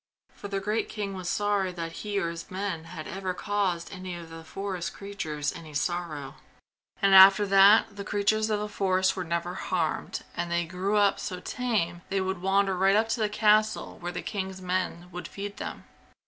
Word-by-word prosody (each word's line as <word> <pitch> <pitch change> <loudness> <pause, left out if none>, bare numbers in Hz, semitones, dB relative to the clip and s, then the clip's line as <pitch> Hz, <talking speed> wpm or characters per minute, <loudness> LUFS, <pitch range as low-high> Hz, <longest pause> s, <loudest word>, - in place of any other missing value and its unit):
For 205 - -8
the 200 -1 -2
great 210 +3 -1
king 205 -2 -4
was 185 -2 -4
sorry 205 0 +1
that 165 -2 -5
he 205 -1 -3
or 170 -4 0
his 170 0 -8
men 185 -4 -3
had 155 -1 -8
ever 190 -1 -3
caused 195 -5 -1
any 185 -1 -6
of 170 -1 -9
the 165 0 -9
forest 190 +1 -4
creatures 155 -7 -3
any 155 -3 -10
sorrow. 155 -3 -3 0.7
And 195 0 +5
after 195 +2 +9
that 200 +2 +6
the 200 - -4
creatures 210 +2 +1
of 210 -1 +1
the 210 - -3
forest 190 -2 +1
were 185 - -3
never 170 +1 -2
harmed 170 -4 -2
and 175 0 -2
they 170 0 0
grew 190 +5 -1
up 200 -1 +3
so 180 - -4
tame 190 -7 -1
they 195 - 0
would 190 -1 -2
wander 195 0 +2
right 195 +2 +4
up 220 +1 +2
to 225 - 0
the 215 -1 +1
castle, 215 0 +2
where 175 0 -4
the 180 - -5
king's 190 -2 -4
men 180 -1 -2
would 180 +1 -6
feed 200 0 -7
them. - - -6
190 Hz, 195 wpm, -28 LUFS, 175-200 Hz, 0.7 s, after